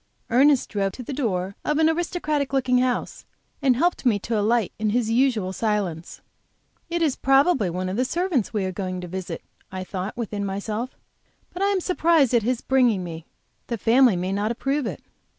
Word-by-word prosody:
Ernest 270 +2 +4
drove 195 -2 -1
to 250 - -8
the 275 - -6
door 195 -8 -2
of 300 - 0
an 315 0 +4
aristocratic 320 -4 -1
looking 255 -2 +2
house, 250 -1 -1 0.4
and 265 -3 +4
helped 345 +7 +1
me 240 -6 +3
to 225 +3 -3
alight 215 -1 +1
in 215 0 +1
his 225 0 0
usual 230 -6 +1
silence. 195 -6 -2 0.7
"It 340 0 0
is 295 -5 +1
probably 270 - +3
one 180 +2 -3
of 185 +3 -3
the 250 - +2
servants 335 - 0
we 210 -4 -1
are 185 - -2
going 185 -1 -4
to 180 - -6
visit," 185 +1 -6 0.3
I 185 0 -4
thought, 190 +4 -5
within 210 -3 -3
myself; 210 +5 -4 0.6
"but 360 - -6
I 395 - +3
am 400 -1 +2
surprised 330 - +3
at 235 - +4
his 245 +2 -1
bringing 245 -8 +2
me. 165 -2 -8 0.4
The 235 - -2
family 235 +1 +4
may 180 +2 -2
not 205 +2 0
approve 270 +3 -1
it." - - -6
235 Hz, 190 wpm, -24 LUFS, 195-275 Hz, 0.7 s, Ernest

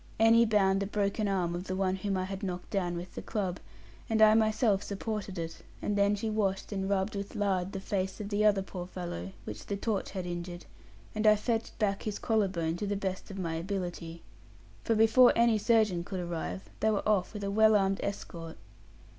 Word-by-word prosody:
Annie 225 +1 +6
bound 195 -3 +3
the 200 - -2
broken 205 +1 0
arm 180 -3 0
of 175 +2 -4
the 185 - -3
one 190 0 0
whom 195 0 -1
I 185 - 0
had 195 +1 -5
knocked 180 -3 -5
down 175 -4 -1
with 175 +1 -7
the - - -6
club, 190 -5 -3 0.5
and 220 -1 +1
I 215 0 +8
myself 215 -2 +3
supported 205 -1 -4
it; 165 -1 -4 0.2
and 205 - -1
then 200 0 +3
she 210 +2 -3
washed 205 -3 -1
and 195 -1 -2
rubbed 200 +1 0
with 200 +3 -5
lard 195 -3 0
the 195 - -4
face 190 0 -2
of 205 -1 -5
the 210 0 +1
other 205 -2 +4
poor 180 -2 -7
fellow, 170 - -6
which 105 0 -8
the 200 - -2
torch 210 -1 -2
had 185 -2 -5
injured; 175 0 -5 0.5
and 215 0 +1
I 215 - +8
fetched 225 +1 -2
back 200 -3 0
his 210 -2 -3
collar 220 -3 +1
bone 170 -3 -2
to 205 - -3
the 205 - 0
best 190 -1 -4
of 195 - -7
my 170 -4 -2
ability. 170 -1 -4 0.6
For 225 - +1
before 225 +3 +6
any 230 -2 +4
surgeon 210 -6 +3
could 190 +1 -5
arrive, 160 - -4 0.2
they 220 - +2
were 210 -1 0
off 210 0 +1
with 205 - -5
a 200 - -1
well 220 +1 +5
armed 195 -1 +2
escort. 170 -5 -5
195 Hz, 215 wpm, -30 LUFS, 180-215 Hz, 0.6 s, I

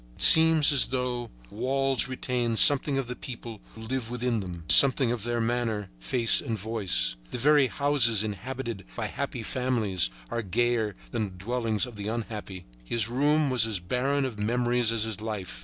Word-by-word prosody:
It - - -2
seems 160 -1 +8
as 140 - +3
though 125 -2 -3 0.2
walls 135 +3 -1
retain 125 -2 -2
something 140 +3 +5
of 135 - -2
the 125 +1 -7
people 115 -4 -9
who 110 - -11
live 115 0 -4
within 120 -1 -2
them, 90 -4 -8
something 130 - +6
of 120 -3 -3
their 120 0 -2
manner, 115 -3 -2
face 115 - +3
and 110 - -4
voice. 95 - -1
The - - -6
very 145 +2 +3
houses 120 -5 +1
inhabited 115 +1 -6
by - - -4
happy - - -5
families 110 - 0 0.2
are 120 - -2
gayer 110 +1 -1 0.2
than 115 -3 -2
the 95 -2 -11
dwellings 115 -2 -1
of 120 -4 -12
the 100 0 -6
unhappy. 105 -5 -6 0.2
His 110 - -2
room 145 +3 +1
was 120 -3 +2
as 105 -4 -1
barren 135 +9 -1
of 115 -5 -6
memories 120 +1 0
as 115 -2 0
his 110 -2 -5
life. 105 - -6
120 Hz, 175 wpm, -26 LUFS, 105-130 Hz, 0.2 s, seems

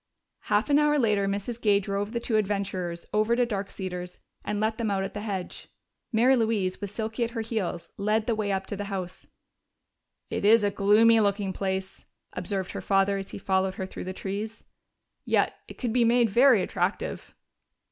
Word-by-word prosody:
Half 210 +7 +1
an 285 - +6
hour 295 0 +3
later 210 -6 +2
Mrs. 205 +4 -3
Gay 205 -2 +4
drove 200 +1 -3
the 235 - -1
two 230 -1 0
adventurers 190 -4 -2
over 215 +2 +3
to 245 0 +3
Dark 200 -4 -3
Cedars 180 -2 -6 0.2
and 210 - -2
let 220 +1 0
them 225 -2 0
out 195 -1 0
at 195 - -5
the 205 - -5
hedge. 195 -4 -5 0.4
Mary 245 +3 +4
Louise, 220 -6 0
with 205 - -3
Silky 220 +3 -3
at 230 - -1
her - - 0
heels, 195 -7 -4
led 215 +2 +1
the 235 - +1
way 215 -2 -1
up 195 0 -1
to 205 - -4
the 205 +1 -4
house. 190 -3 -5 1.0
"It - - -2
is 215 +1 +6
a 205 - +2
gloomy 215 +3 +5
looking 200 -2 +1
place," 190 0 -3 0.3
observed 190 +1 -3
her - - -5
father 195 0 +2
as 195 - -6
he - - -7
followed 190 -1 0
her 190 - -4
through 185 - -8
the 185 - -3
trees. 205 +4 -5 0.6
"Yet - - +2
it - - -11
could 240 -4 -2
be 245 -1 +4
made 235 -1 +3
very 245 -3 +5
attractive." - - -3
205 Hz, 195 wpm, -27 LUFS, 195-225 Hz, 1.0 s, an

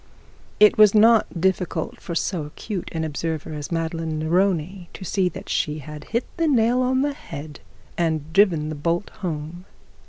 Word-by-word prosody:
It 210 0 +6
was 215 -1 +7
not 220 -4 +5
difficult 185 0 -1
for 170 - -5
so 165 -2 -1
acute 180 +5 -6
an 160 -1 -2
observer 160 0 -3
as 150 +1 -6
Madeline 165 -1 -2
Neroni 175 +2 0
to 190 - -8
see 185 0 +1
that - - -10
she 150 0 -1
had 150 0 -9
hit 235 +2 -1
the 330 -1 +2
nail 245 -2 +3
on 260 +1 +2
the 290 0 0
head 150 - -9 0.4
and 160 -2 -1
driven 170 -6 +3
the - - -3
bolt 170 +5 -1
home. 165 0 -5
170 Hz, 165 wpm, -23 LUFS, 155-205 Hz, 0.4 s, was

